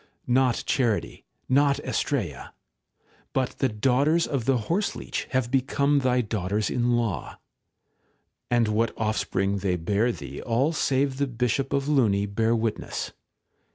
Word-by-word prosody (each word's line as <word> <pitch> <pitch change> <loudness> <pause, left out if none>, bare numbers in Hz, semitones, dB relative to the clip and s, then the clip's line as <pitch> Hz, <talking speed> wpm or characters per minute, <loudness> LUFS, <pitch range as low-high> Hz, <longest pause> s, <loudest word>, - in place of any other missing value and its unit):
Not 125 -1 +2
charity, 120 -6 0 0.2
not 140 +1 +3
Astraea, 95 - -2 0.8
but 130 -2 -1
the 135 - +2
daughters 135 +9 +2
of 135 -5 -2
the 135 0 +3
horseleech 200 +5 -2
have 130 -2 0
become 140 +2 +2
thy 125 -2 +2
daughters 105 -1 -1
in 120 0 +2
law. 115 -6 -3 1.1
And 120 -2 +3
what 110 +2 0
offspring 100 -2 0
they 95 -2 0
bear 100 +8 +1
thee - - -8
all 130 +7 +1
save 135 -2 +1
the 140 0 0
Bishop 125 +2 -1
of 140 0 0
Luni 110 -9 +3
bear 110 +3 +1
witness. 110 -1 -3
120 Hz, 130 wpm, -26 LUFS, 110-135 Hz, 1.1 s, not